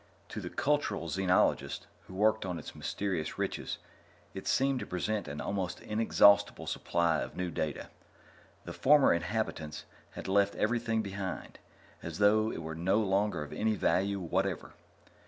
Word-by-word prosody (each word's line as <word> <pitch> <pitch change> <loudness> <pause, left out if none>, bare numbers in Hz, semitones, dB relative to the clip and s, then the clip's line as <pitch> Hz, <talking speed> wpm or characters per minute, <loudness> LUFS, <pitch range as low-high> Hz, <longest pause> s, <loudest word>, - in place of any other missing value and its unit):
To - - -5
the - - -5
cultural 135 - 0
xenologists 90 +2 +1 0.2
who 95 - -10
worked 110 +2 +3
on 90 -2 -3
its - - -8
mysterious 95 -6 -3
riches, - - -3 0.6
it - - -7
seemed 135 -1 +2
to - - -4
present 105 +4 -2
an 75 +1 -5
almost 95 -3 -2
inexhaustible 105 -2 +4
supply 85 -2 +1
of - - -5
new 90 -1 -2
data. 75 -2 -3 0.8
The - - -6
former 145 0 +5
inhabitants 85 -4 -3 0.3
had - - -7
left 100 +1 +3
everything 115 0 0
behind, 100 -2 -5 0.4
as 85 -1 -6
though 110 +2 +4
it 85 - -5
were 80 0 -5
no 85 +5 +1
longer 100 -4 +1
of 75 - -9
any 110 0 +1
value 100 0 +1
whatever. 95 +1 -2
100 Hz, 150 wpm, -31 LUFS, 85-110 Hz, 0.8 s, former